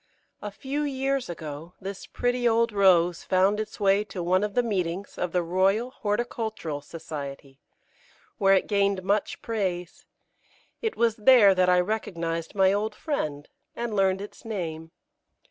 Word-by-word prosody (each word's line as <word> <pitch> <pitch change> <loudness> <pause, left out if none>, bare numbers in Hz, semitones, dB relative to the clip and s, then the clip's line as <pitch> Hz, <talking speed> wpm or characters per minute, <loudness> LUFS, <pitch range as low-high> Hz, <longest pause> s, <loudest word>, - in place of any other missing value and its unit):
A 210 - -4
few 270 +8 -4
years 275 -3 -1
ago 160 +1 -7
this 195 0 -7
pretty 245 0 0
old 230 0 +2
Rose 180 -4 +4
found 190 +3 +2
its 215 0 -5
way 200 0 +3
to 185 -3 -6
one 185 +3 +2
of 210 -1 -3
the 245 - +3
meetings 190 -3 -2
of 180 - -2
the 180 0 +1
Royal 195 +8 +1
Horticultural 215 - -3
Society, 140 -3 -8 0.8
where 195 -1 +5
it 190 - +2
gained 200 -2 +1
much 200 +2 -1
praise. 185 -6 -3 0.7
It 450 -1 -2
was 230 -1 +2
there 215 -3 +7
that 185 -1 +3
I 180 0 +5
recognised 170 -4 -3
my 190 -1 +4
old 210 +1 -1
friend, 150 - -3 0.3
and 235 -2 -3
learned 190 -1 +2
its 205 - -10
name. 165 -7 -5
195 Hz, 150 wpm, -26 LUFS, 175-220 Hz, 0.8 s, there